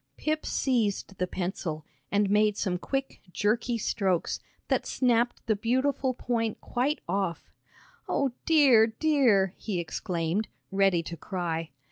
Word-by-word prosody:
Pip 310 0 -1
seized 215 -6 0
the 180 - 0
pencil, 175 -4 -4 0.3
and 205 0 +3
made 210 +1 +3
some 180 -3 -1
quick, 270 +6 -3
jerky 230 +5 0
strokes 195 -5 0 0.3
that - - 0
snapped 240 -1 +1
the 220 - +2
beautiful 260 +4 0
point 230 -3 -1
quite 270 +5 -1
off. 185 -2 -2 0.6
"O 275 -2 +1 0.2
dear, 270 -9 +6
dear!" 225 - +3
he 200 -5 -3
exclaimed, 170 +4 -2 0.2
ready 195 -3 +3
to 170 - -6
cry. 165 -1 -3
210 Hz, 125 wpm, -28 LUFS, 185-245 Hz, 0.6 s, dear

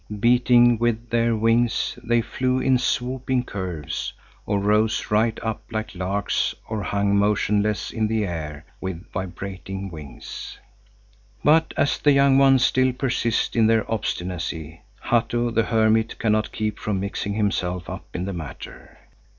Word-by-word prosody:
Beating 120 0 +5
with 120 0 -1
their 115 0 +2
wings, 115 +2 +1
they 120 0 +2
flew 125 +2 -1
in 130 -1 +3
swooping 125 0 -1
curves, 90 - -4 0.3
or 100 - +1
rose 105 +2 +1
right 110 +1 +2
up 110 -1 -3
like 110 -1 -4
larks 95 +2 -1
or 110 -1 -3
hung 100 +1 0
motionless 105 +1 +1
in 110 -2 0
the 110 -1 0
air 75 -5 -5 0.2
with 95 -1 -5
vibrating 95 +1 -5
wings. 75 -6 -9 0.9
But 160 +2 +4
as 145 - +1
the 145 - +4
young 140 -1 +5
ones 135 -2 +5
still 130 -1 +2
persist 120 -3 0
in 115 -2 +4
their 115 -1 +3
obstinacy, 85 -6 -3 0.2
Hatto 120 0 +1
the 115 - +2
hermit 110 0 +2
cannot 110 -1 +1
keep 110 -1 -3
from 105 -3 -2
mixing 100 +1 -3
himself 90 -4 -1
up - - -7
in 90 +1 -2
the 100 - -3
matter. 80 -5 -9
110 Hz, 140 wpm, -23 LUFS, 95-120 Hz, 0.9 s, Beating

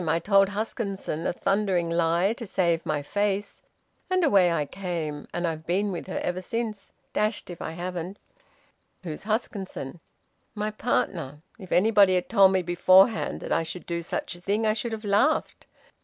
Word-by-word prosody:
I 165 - +3
told 195 +3 +4
Huskisson 200 -5 -3
a - - 0
thundering 190 -2 +1
lie, 170 +4 +2
to 230 -2 -8
save 170 -3 +1
my 145 -1 -1
face, 205 +4 -1 0.5
and 370 -1 +2
away 195 - +5
I 155 -3 0
came, 165 -4 -4
and 175 0 -2
I've 160 -1 -4
been 195 +4 +1
with 175 - -5
her 190 - -4
ever 180 +1 -2
since. 215 +1 -4 0.2
Dashed 210 -3 -1
if 175 - -9
I 160 - -4
haven't!" 180 +2 -5 0.9
"Who's 160 +1 -6
Huskisson?" 200 - -3 0.6
"My 210 0 -2
partner. 165 - -2 0.2
If 190 -3 -11
anybody 200 -1 +5
had 180 - -1
told 195 -4 +6
me 190 -1 +1
beforehand 185 +5 +4
that - - -6
I - - +3
should 170 +2 -7
do 170 -1 -3
such 170 - -4
a 175 - -13
thing 205 +4 0
I 215 - +3
should 230 +2 -3
have 220 0 -6
laughed. 210 +10 +1
185 Hz, 170 wpm, -26 LUFS, 170-210 Hz, 0.9 s, told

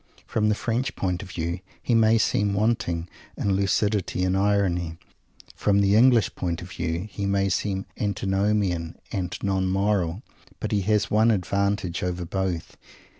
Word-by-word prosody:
From 105 -1 +1
the 105 - +2
French 120 +4 -2
point 90 -2 -1
of 100 - -9
view 85 0 -3 0.2
he 120 - -1
may 115 0 +5
seem 105 -2 +1
wanting 100 -6 0 0.3
in 100 - 0
lucidity 100 -1 +1
and 95 0 +1
irony; 95 -4 +1 0.6
from 100 -1 +2
the 100 0 +3
English 120 -1 +5
point 85 -2 -2
of 90 - -10
view 85 +3 -3
he 100 -1 -3
may 100 0 +1
seem 95 +1 -1
antinomian 95 -3 0
and 90 -3 -3
non 95 -1 +1
moral. 95 0 0 0.4
But - - -3
he 105 - +2
has 105 +2 +1
one 110 +2 +4
advantage 100 -2 0
over 90 -1 -2
both. 95 -1 -3
100 Hz, 155 wpm, -25 LUFS, 90-105 Hz, 0.6 s, may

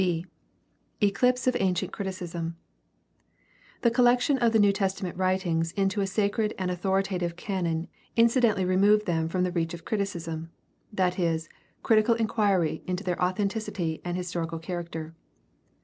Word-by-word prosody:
b) 175 -2 0 0.7
Eclipse 240 +4 +2
of 255 -1 +2
ancient 190 0 0
criticism. 175 -4 -4 0.6
— - - -32
The 235 - +4
collection 245 +3 +3
of 235 -2 +3
the 225 - +4
New 205 -2 +5
Testament 195 -2 -2
writings 180 -3 0
into 195 +1 0
a 195 - 0
sacred 210 +2 0
and 185 -1 -1
authoritative 185 -1 -1
canon 175 -3 -2 0.3
incidentally 230 -4 +4
removed 205 +3 +4
them 165 -3 0
from 180 +1 0
the 180 - 0
reach 170 -1 -1
of 170 - -13
criticism, 170 -6 -3 0.4
that 185 -3 0
is, 165 -2 0 0.3
critical 225 +1 +4
inquiry 205 -8 +1
into 180 +2 -2
their 180 -2 -2
authenticity 185 -3 -1
and 175 0 -2
historical 170 -2 -3
char 175 +2 -4
aracter. 160 -1 -7
185 Hz, 145 wpm, -27 LUFS, 170-210 Hz, 0.7 s, New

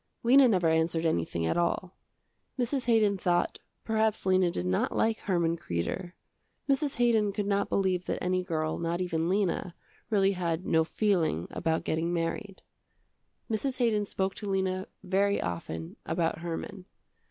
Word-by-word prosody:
Lena 260 +3 +7
never 185 -7 +2
answered 160 +1 +1
anything 85 - 0
at 80 - 0
all. 175 +1 -1 0.6
Mrs. 255 +1 -1
Haydon 215 -4 +3
thought, 175 -1 +1 0.2
perhaps 220 -2 0
Lena 185 -1 +4
did 90 - -3
not 90 0 0
like 225 0 +1
Herman 170 -3 0
Kreder. 165 - -3 0.5
Mrs. 280 0 +1
Haydon 230 -4 +3
could 205 0 -2
not 200 0 0
believe 185 -2 +1
that - - -2
any 185 0 0
girl 160 -3 -2
not 170 +1 -1
even 170 -2 -1
Lena, 185 -3 0 0.3
really 200 -3 +3
had 175 -2 -2
no 160 0 +3
feeling 165 - 0
about 160 -1 -1
getting 160 +2 -1
married. 175 +4 -3 0.8
Mrs. 255 +4 -1
Haydon 225 -5 +2
spoke 190 -1 -1
to 205 - -6
Lena 190 -1 -1 0.2
very 200 +2 +2
often 80 -2 -5
about 165 -1 -1
Herman. 175 +3 -5
185 Hz, 150 wpm, -29 LUFS, 165-205 Hz, 0.8 s, Lena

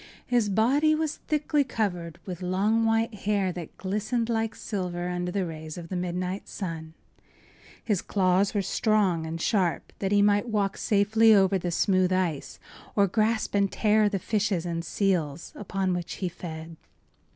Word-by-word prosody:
His 240 -4 +1
body 275 +10 +3
was 315 -1 -2
thickly 300 -1 +1
covered 180 - -3
with 180 -2 -6
long, 200 +5 +1
white 225 +1 +1
hair 200 -2 0
that 175 -2 -8
glistened 215 +5 -1
like 225 -1 -1
silver 180 -4 -3
under 180 0 -2
the 195 0 -1
rays 155 -1 -7
of 170 -1 -8
the 185 - -3
midnight 180 +2 -3
sun. 160 -4 -6 0.9
His 205 -6 0
claws 190 +1 +1
were 200 - +1
strong 190 -5 +1
and 165 +1 -4
sharp, 180 -1 0
that 195 0 -1
he 205 0 +4
might 205 +3 +2
walk 200 -3 0
safely 220 +1 +4
over 195 -1 +4
the 175 - -2
smooth 185 +1 +2
ice 180 -6 -1 0.4
or 200 - +5
grasp 215 +3 0
and 200 -1 +2
tear 215 -1 +3
the 200 - -1
fishes 200 -2 -1
and 170 -1 -3
seals 170 -5 -1
upon 195 -2 -2
which 175 -1 -4
he 185 - -3
fed. 160 -2 -8
195 Hz, 165 wpm, -27 LUFS, 175-215 Hz, 0.9 s, or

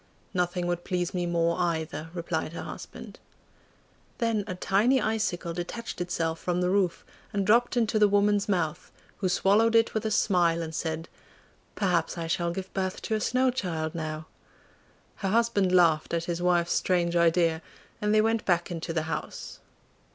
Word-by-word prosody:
'Nothing 180 -1 0
would 175 0 -2
please 180 -1 -2
me 175 -1 -1
more 170 -1 +1
either,' 160 -2 -2
replied 165 -2 -3
her - - -5
husband. - - -9 1.0
Then 230 -3 0
a 185 - -4
tiny 210 +8 +2
icicle 215 -7 -1
detached 180 +4 -5
itself 165 -2 -1
from 180 -1 -1
the 180 0 +1
roof, 190 -3 +1 0.3
and 200 -2 -1
dropped 240 +4 +3
into 220 -2 +2
the 210 - +6
woman's 205 0 +2
mouth, 165 -6 -1 0.3
who 185 - 0
swallowed 210 +5 +3
it 225 0 +4
with 220 - -1
a 220 - 0
smile, 175 -5 +2
and 160 0 -6
said, 160 0 -3 0.7
'Perhaps 180 -4 0
I 165 - -3
shall 170 +1 0
give 190 +2 -6
birth 190 -1 -2
to 220 - -2
a 215 - +1
snow 255 +3 +2
child 165 -10 -3
now!' 155 -1 -4 0.9
Her 195 - -2
husband 210 -3 +2
laughed 170 -3 +3
at 165 - -1
his 175 0 -3
wife's 175 -1 +2
strange 175 -2 +1
idea, 170 -1 +3 0.4
and 210 0 +1
they 215 0 +5
went 225 0 +1
back 175 -1 +1
into 165 0 -4
the 160 -1 0
house. 160 -1 -5
180 Hz, 170 wpm, -27 LUFS, 170-205 Hz, 1.0 s, the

